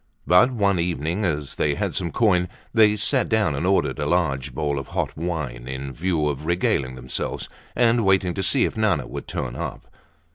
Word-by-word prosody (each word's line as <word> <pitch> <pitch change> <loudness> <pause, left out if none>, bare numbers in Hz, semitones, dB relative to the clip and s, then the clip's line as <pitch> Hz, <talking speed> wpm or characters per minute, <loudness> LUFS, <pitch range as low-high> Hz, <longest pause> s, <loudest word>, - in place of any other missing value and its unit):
But 90 +7 +6
one 100 -7 +1
evening, 85 +3 -1
as 75 -5 -2
they 75 -1 0
had - - -2
some 85 - -2
coin, 90 -5 +2 0.2
they 110 -2 +5
sat 125 +5 +1
down 110 -8 +2
and 75 +6 -1
ordered 95 0 +1
a - - -1
large 65 -2 0
bowl 75 -2 -1
of 70 - -7
hot - - -1
wine 75 -8 -4
in 65 +1 -5
view 80 0 0
of 75 +1 -3
regaling 70 -7 0
themselves 65 0 -4 0.3
and 120 -1 +3
waiting 95 -2 +3
to 95 - -3
see 130 +6 +2
if - - -3
Nana 100 - +1
would - - -7
turn - - -4
up. - - -6
85 Hz, 190 wpm, -23 LUFS, 70-100 Hz, 0.3 s, But